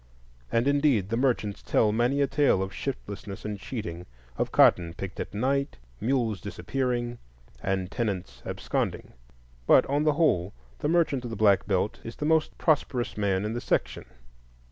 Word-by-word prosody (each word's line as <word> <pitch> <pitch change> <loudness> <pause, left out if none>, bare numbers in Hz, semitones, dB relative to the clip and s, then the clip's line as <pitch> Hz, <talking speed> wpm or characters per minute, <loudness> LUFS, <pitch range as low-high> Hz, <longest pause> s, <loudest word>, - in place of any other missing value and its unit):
And, 115 +3 +2
indeed, 140 -9 +3
the 115 - 0
merchants 115 -5 0
tell 105 - +2
many 120 +6 +1
a - - +5
true 145 +2 0
tale 95 - +3
of 95 - -6
shiftlessness 105 -7 -6
and 105 -1 -4
cheating; 90 -6 -6 0.3
of - - -1
cotton 85 -1 +4
picked 95 0 -6
at - - -4
night, 140 +5 0 0.2
mules 115 -6 0
disappearing, 120 +2 -2 0.4
and 95 -1 -1
tenants 105 -7 -3
absconding. - - -3 0.5
But - - +6
on 145 +2 0
the 155 -1 +3
whole 100 - +2 0.3
the 145 - -1
merchant 160 -6 +2
of 120 - -5
the 115 - -5
Black 100 -2 +3
Belt 100 +1 0
is 115 - -7
the 150 - -4
most 160 0 +2
prosperous 140 -6 +1
man 100 -1 0
in 110 - -2
the 120 - -3
section. - - -1
115 Hz, 165 wpm, -27 LUFS, 100-135 Hz, 0.5 s, But